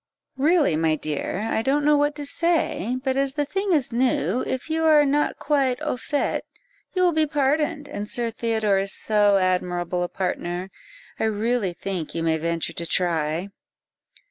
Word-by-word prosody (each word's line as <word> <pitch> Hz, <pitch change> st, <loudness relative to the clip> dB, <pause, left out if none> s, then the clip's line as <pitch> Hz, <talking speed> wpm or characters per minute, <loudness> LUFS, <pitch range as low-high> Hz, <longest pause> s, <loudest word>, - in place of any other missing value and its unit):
"Really, 300 Hz, -, +3 dB
my 160 Hz, 0 st, +2 dB
dear, 155 Hz, +5 st, -3 dB
I 220 Hz, -, 0 dB
don't 280 Hz, +4 st, +1 dB
know 300 Hz, 0 st, +5 dB
what 290 Hz, 0 st, +1 dB
to 290 Hz, -, -5 dB
say; 280 Hz, -, 0 dB
but 265 Hz, -2 st, 0 dB
as 275 Hz, 0 st, +1 dB
the 295 Hz, -1 st, 0 dB
thing 390 Hz, +6 st, -2 dB
is 285 Hz, -8 st, +1 dB
new, 240 Hz, -, +1 dB
if 260 Hz, -, -3 dB
you 320 Hz, 0 st, -1 dB
are 305 Hz, -2 st, +6 dB
not 290 Hz, +2 st, +1 dB
quite 275 Hz, -4 st, +1 dB
au 300 Hz, -, -1 dB
fait, 285 Hz, +4 st, -1 dB, 0.5 s
you 365 Hz, -, +2 dB
will 355 Hz, -, +4 dB
be 315 Hz, -1 st, +2 dB
pardoned, 290 Hz, +1 st, 0 dB
and 210 Hz, -7 st, -5 dB
Sir 240 Hz, -3 st, -1 dB
Theodore 220 Hz, -3 st, +1 dB
is 195 Hz, 0 st, 0 dB
so 205 Hz, -2 st, +3 dB
admirable 180 Hz, -1 st, 0 dB
a 175 Hz, -, -1 dB
partner, 180 Hz, 0 st, -3 dB, 0.5 s
I -, -, +1 dB
really 220 Hz, -2 st, 0 dB
think 180 Hz, -3 st, -5 dB
you 165 Hz, -, -1 dB
may 160 Hz, -1 st, +2 dB
venture 170 Hz, 0 st, -2 dB
to 170 Hz, -, -4 dB
try." 165 Hz, 0 st, -1 dB
235 Hz, 175 wpm, -24 LUFS, 180-290 Hz, 0.5 s, are